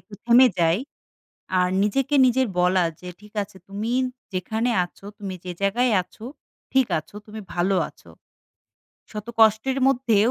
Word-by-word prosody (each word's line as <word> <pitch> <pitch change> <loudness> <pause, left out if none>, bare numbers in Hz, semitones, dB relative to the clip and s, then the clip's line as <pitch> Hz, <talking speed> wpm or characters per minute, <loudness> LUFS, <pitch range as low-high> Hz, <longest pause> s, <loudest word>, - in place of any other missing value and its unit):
একটু 210 - -14
থেমে 245 +2 +7
যাই। 165 +3 +3 0.8
আর 180 0 +2
নিজেকে 270 +7 0
নিজের 255 0 +2
বলা 180 0 +3 0.2
যে, 180 - -9
ঠিক 210 0 -16
আছে 195 -1 -15
তুমি 210 +4 -4 0.4
যেখানে 220 +6 -1 0.2
আছো 195 - -18
তুমি 195 -2 -5
যে 180 - -4
জায়গায় 230 +5 +2
আছো 215 +5 -13 0.5
ঠিক 265 -2 +4
আছো, 200 - -17
তুমি 215 0 -8
ভালো 180 +3 +1
আছো। - - -20 1.0
শত 210 0 -7
কষ্টের 220 +5 +4
মধ্যেও 240 -4 +3
215 Hz, 145 wpm, -23 LUFS, 195-245 Hz, 1.0 s, থেমে